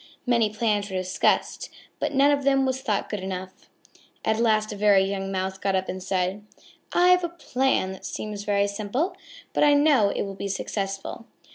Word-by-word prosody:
Many 235 -3 +3
plans 210 -1 0
were 190 - -3
discussed, 185 0 0 0.3
but - - -1
none 280 +1 +4
of 285 -1 +1
them 270 -1 +3
was 260 0 -1
thought 210 -5 -1
good 210 - -4
enough. 185 0 -7 0.6
At 220 0 +1
last 215 -2 +2
a - - -5
very 200 -1 +4
young 195 0 -3
Mouse 190 0 -3
got 195 0 0
up 190 0 -1
and 185 - -5
said: 190 +2 -1 0.5
"I 355 +1 +4
have 360 0 +5
a 345 - -1
plan 265 - 0
that 190 - -10
seems 210 -1 -5
very 200 -1 +2
simple, 220 - -2 0.4
but - - +2
I 290 -1 +6
know 285 -8 +4
it - - -2
will 195 -1 -5
be 200 +1 -5
successful. 195 +3 -4
205 Hz, 190 wpm, -25 LUFS, 195-260 Hz, 0.6 s, I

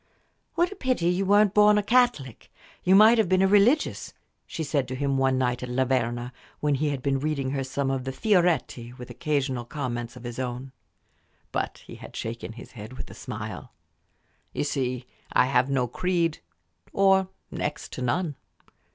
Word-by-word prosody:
"What 345 +2 +2
a - - -7
pity 255 - 0
you 185 +2 0
weren't 205 0 +5
born 210 0 +6
a 210 - +2
Catholic! 230 - +1 0.3
you 185 +1 +5
might 220 +3 +7
have 215 - +2
been 185 0 +4
a - - +5
religious," 210 +9 +2 0.3
she 160 - -4
said 140 -3 0
to 130 - -4
him 140 +1 0
one 135 -1 +2
night 125 -1 0
at 125 - -5
La 130 +2 +1
Verna, 120 -1 -1 0.3
when 150 -1 +1
he 145 +2 0
had 140 -3 -3
been 135 -1 +1
reading 140 -2 -1
her 135 -1 -1
some 135 +1 -2
of 135 -1 -2
the 135 - -3
Fioretti 160 - +1
with 125 -1 -9
occasional 130 -1 -1
comments 120 -2 -4
of 125 - -11
his 120 0 -6
own. 130 +1 -4 0.8
But - - -3
he - - -10
had - - -12
shaken 115 0 -5
his 115 - -11
head 110 +1 -9
with 130 - -8
a - - -9
smile. - - -7 0.8
"You - - -1
see, 130 -4 -2 0.3
I - - +5
have 130 0 +2
no 130 -3 +1
creed 170 +4 0 0.5
or 190 -1 +4 0.2
next - - -4
to - - -5
none." 150 +6 0
135 Hz, 185 wpm, -26 LUFS, 125-185 Hz, 0.8 s, might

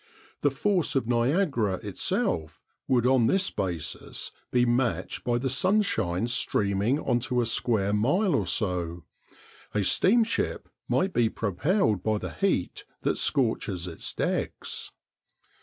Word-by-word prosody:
The 145 - +4
force 175 +4 +1
of 135 - +1
Niagara 120 - +1
itself 80 -2 -2 0.3
would 125 -2 +2
on 125 -3 +4
this 195 +6 +1
basis 85 -6 -4 0.2
be 125 -1 +3
matched 120 0 0
by 120 -1 +1
the 130 +3 -1
sunshine 135 - +1
streaming 105 +1 0
on 120 - +1
to 125 +1 -1
a 120 - +2
square 110 -3 0
mile 155 - +2
or 100 - +1
so. 90 -3 -1 0.7
A 105 - +2
steamship 225 - +2 0.2
might 185 0 +1
be 115 -2 +3
propelled 110 - 0
by 110 +1 0
the - - -6
heat 195 - -1 0.2
that - - 0
scorches 110 -8 0
its 85 - -4
decks. - - -3
120 Hz, 130 wpm, -27 LUFS, 100-145 Hz, 0.7 s, The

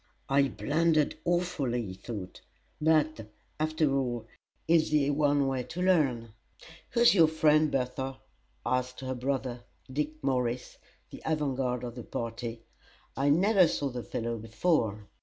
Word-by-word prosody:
"I 140 0 +4
blundered 155 +2 +1
awfully," 170 -9 0
he 95 - -6
thought; 95 -1 -8 0.4
"but, 155 -7 +2 0.3
after 155 -2 +1
all, 120 -4 -1 0.4
it's 165 -1 +4
the 145 -2 +2
one 145 -1 +2
way 135 -1 -1
to 180 - -6
learn." 135 -12 +2 0.6
"Who's 235 0 +5
your 165 -5 +6
friend, 155 -1 +3
Bertha?" 130 +1 -2 0.5
asked 125 +1 -1
her 130 0 -3
brother, 125 -1 -3 0.3
Dick 150 +2 -3
Morris, 125 -2 -1 0.3
the - - -10
avant 150 -4 0
guard 125 -2 -1
of 120 -1 -5
the 120 -1 -8
party. 115 0 -5 0.5
"I 140 +1 +1
never 185 +4 +5
saw 145 -3 -1
the 125 -1 -5
fellow 115 0 -3
before." 110 - 0
135 Hz, 140 wpm, -29 LUFS, 120-155 Hz, 0.6 s, your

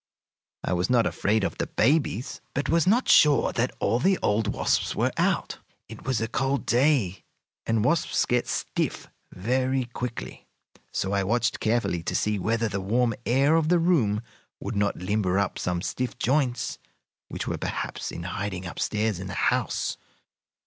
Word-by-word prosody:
I - - -1
was 90 +4 0
not 120 -3 +4
afraid 110 +1 +1
of - - -2
the - - -1
babies, 135 - +1
but 140 - -1
was 165 0 +3
not 235 +6 +3
sure 150 -2 +5
that 125 +1 0
all 115 - +1
the 190 +7 +3
old 105 +1 +2
wasps - - 0
were - - +1
out. - - 0 0.3
It - - -11
was 130 -3 +1
a 115 - -1
cold 135 +4 -1
day, 120 - +2 0.4
and 115 -1 +1
wasps 165 +4 +2
get 125 0 +1
stiff - - -2 0.2
very 130 +5 0
quickly, 120 0 -6 0.4
so 95 - -2
I 100 -1 +1
watched 120 +4 0
carefully 110 -6 0
to 85 - -3
see 105 -1 +1
whether 115 +4 0
the 100 -2 -3
warm 115 +4 +1
air 140 +6 +4
of 160 -1 +2
the 175 - +5
room 130 - +2 0.4
would - - -5
not 100 0 +1
limber 95 0 0
up 100 -2 0
some 90 0 -2
stiff 125 +3 -3
joints 130 -1 0 0.5
which - - -5
were - - -2
perhaps - - -4
in 85 - -6
hiding 95 +1 -4
up 90 - -7
stairs 105 -3 0
in 95 - -6
the - - -6
house. - - 0
115 Hz, 170 wpm, -26 LUFS, 100-130 Hz, 0.5 s, sure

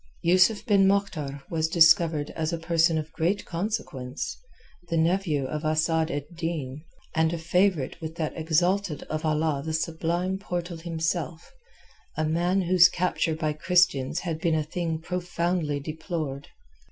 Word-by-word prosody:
Yusuf 185 +5 +4
ben 200 -3 +4
Moktar 155 -9 -1
was 160 -1 +1
discovered 160 -2 +4
as 160 0 -2
a 170 - -1
person 165 0 +2
of 155 0 -4
great 175 +5 -1
consequence, 165 - -4 0.5
the 165 - 0
nephew 165 -4 +1
of 150 +4 -4
Asad 160 +1 +1
ed 145 -2 -3
Din, 155 -5 -4 0.3
and 160 0 +2
a 170 - -2
favourite 175 -2 +1
with 160 0 -6
that 160 -2 -3
Exalted 170 +1 0
of 155 +1 -2
Allah 155 -2 0
the 160 +1 -3
Sublime 170 +4 -1
Portal 175 -3 -4
himself, 165 0 -3 0.6
a 155 - +1
man 175 +4 +1
whose 180 0 +6
capture 180 -2 0
by 155 -1 -1
Christians 175 -2 +2
had 165 -3 -4
been 165 -2 +2
a 155 - +1
thing 165 +1 -3
profoundly 170 -3 -2
deplored. 155 -2 -5
165 Hz, 145 wpm, -26 LUFS, 155-175 Hz, 0.6 s, whose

